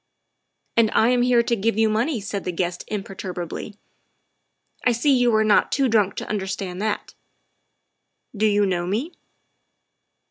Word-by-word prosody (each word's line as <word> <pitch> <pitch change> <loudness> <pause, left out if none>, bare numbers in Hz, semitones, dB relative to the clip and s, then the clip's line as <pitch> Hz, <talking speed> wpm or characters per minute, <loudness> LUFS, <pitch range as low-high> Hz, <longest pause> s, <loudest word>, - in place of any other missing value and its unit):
"And 230 -2 +4
I 225 - +4
am 250 -1 +3
here 245 -1 +4
to 235 - 0
give 220 0 0
you 220 0 +4
money," 230 +5 0
said 200 -1 -5
the 180 - -2
guest 175 0 -3
imperturbably. 195 -1 -6 0.3
' - - -49
' - - -40
I 250 - +3
see 270 +4 +2
you 245 -1 +3
are 215 - +4
not 215 -1 +3
too 275 -2 +2
drunk 210 -4 +2
to - - -5
under 200 -2 -2
stand 190 -1 -4
that. 215 -1 -3 1.2
Do 215 +1 +2
you 205 -1 +3
know 175 -2 -1
me?" 235 - -2
215 Hz, 170 wpm, -23 LUFS, 195-235 Hz, 1.2 s, And